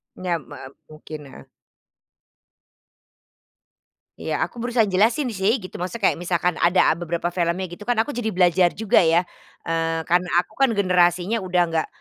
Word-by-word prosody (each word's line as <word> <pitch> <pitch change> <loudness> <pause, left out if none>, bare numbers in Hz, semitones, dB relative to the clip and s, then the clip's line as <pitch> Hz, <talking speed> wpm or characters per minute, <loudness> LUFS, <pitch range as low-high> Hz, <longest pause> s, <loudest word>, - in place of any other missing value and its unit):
Nyam 175 -5 -3
me - - -10 0.3
mungkin, 155 -1 -10
heeh. 135 - -13 2.7
Iya 155 - -3
aku 235 +6 -9
berusaha 240 -3 +1
jelasin 225 +9 +2
sih 215 +2 0
gitu 185 -3 -11
maksudnya 185 +4 -1
kayak - - +1
misalkan 175 -1 0
ada 175 +2 +4
a - - +3
beberapa 170 0 -3
filmnya 175 +1 -1
gitu 175 +4 -11
kan, 235 +1 0
aku 285 +6 -1
jadi 220 -2 -2
belajar 180 -1 +3
juga 215 -3 +2
ya, 170 +2 +2 0.4
eee, 165 0 -1
karena 175 +1 +1
aku 200 +4 -5
kan 270 -3 +2
generasinya 185 +1 +1
udah 180 -1 +1
nggak 165 -1 -1
180 Hz, 155 wpm, -22 LUFS, 170-215 Hz, 2.7 s, ada